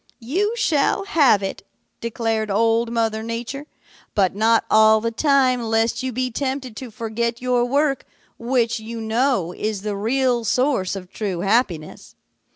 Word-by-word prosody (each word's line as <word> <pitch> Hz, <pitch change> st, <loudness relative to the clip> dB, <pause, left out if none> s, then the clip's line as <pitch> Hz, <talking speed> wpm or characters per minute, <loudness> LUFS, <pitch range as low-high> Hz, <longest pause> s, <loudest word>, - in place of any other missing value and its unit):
"'You 380 Hz, -, -1 dB
shall 370 Hz, -4 st, +1 dB
have 280 Hz, -, +4 dB
it,' 195 Hz, -, -4 dB, 0.4 s
declared 225 Hz, -2 st, -2 dB
Old 230 Hz, +3 st, +2 dB
Mother 225 Hz, -2 st, 0 dB
Nature, 235 Hz, +6 st, -5 dB, 0.5 s
'but 190 Hz, -3 st, +2 dB
not 220 Hz, +3 st, +2 dB
all 220 Hz, 0 st, +5 dB
the 230 Hz, +1 st, -2 dB
time 260 Hz, 0 st, +2 dB
lest 225 Hz, +1 st, 0 dB
you 260 Hz, 0 st, -3 dB
be 255 Hz, +1 st, -2 dB
tempted 260 Hz, -2 st, -3 dB
to 260 Hz, -3 st, -7 dB
forget 230 Hz, +1 st, -3 dB
your 250 Hz, -1 st, +1 dB
work, 275 Hz, +1 st, 0 dB, 0.3 s
which, 235 Hz, -1 st, 0 dB
you 225 Hz, +1 st, -7 dB
know, 225 Hz, -5 st, 0 dB
is 210 Hz, -2 st, -3 dB
the 210 Hz, -1 st, -2 dB
real 240 Hz, +3 st, +1 dB
source 245 Hz, -5 st, +1 dB
of 185 Hz, -2 st, -9 dB
true 190 Hz, -5 st, -3 dB
happiness. 195 Hz, -6 st, -1 dB
230 Hz, 150 wpm, -21 LUFS, 220-255 Hz, 0.5 s, all